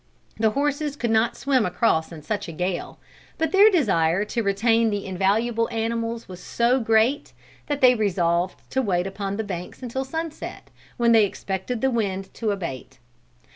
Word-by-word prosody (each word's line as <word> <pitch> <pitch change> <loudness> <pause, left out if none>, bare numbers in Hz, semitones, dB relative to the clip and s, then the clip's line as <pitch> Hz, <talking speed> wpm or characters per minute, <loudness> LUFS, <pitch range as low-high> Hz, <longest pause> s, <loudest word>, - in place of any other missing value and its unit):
The 220 0 +4
horses 285 +3 -1
could 235 -5 -2
not 225 +1 +2
swim 270 -4 +2
across 180 -4 +1
in 155 -3 -10
such 215 +4 -3
a - - -6
gale, 180 +2 -3 0.4
but 320 0 0
their 400 +2 +7
desire 195 - +2
to 230 +2 -2
retain 225 +3 +2
the 205 -2 -3
invaluable 215 +5 0
animals 230 0 -2
was 180 -1 -9
so 240 +6 +1
great 225 +4 +2 0.3
that 290 -1 -2
they 255 -1 +7
resolved 180 -5 0
to 265 - +1
wait 180 -6 0
upon 195 0 -4
the 220 - -1
banks 180 +4 -7
until 255 +2 -3
sunset, 320 +3 -6 0.3
when 235 -1 +3
they 225 -2 +6
expected 195 +5 -4
the 265 - +2
wind 195 -5 -2
to 225 - -2
abate. 165 -10 -5
220 Hz, 170 wpm, -24 LUFS, 190-245 Hz, 0.4 s, their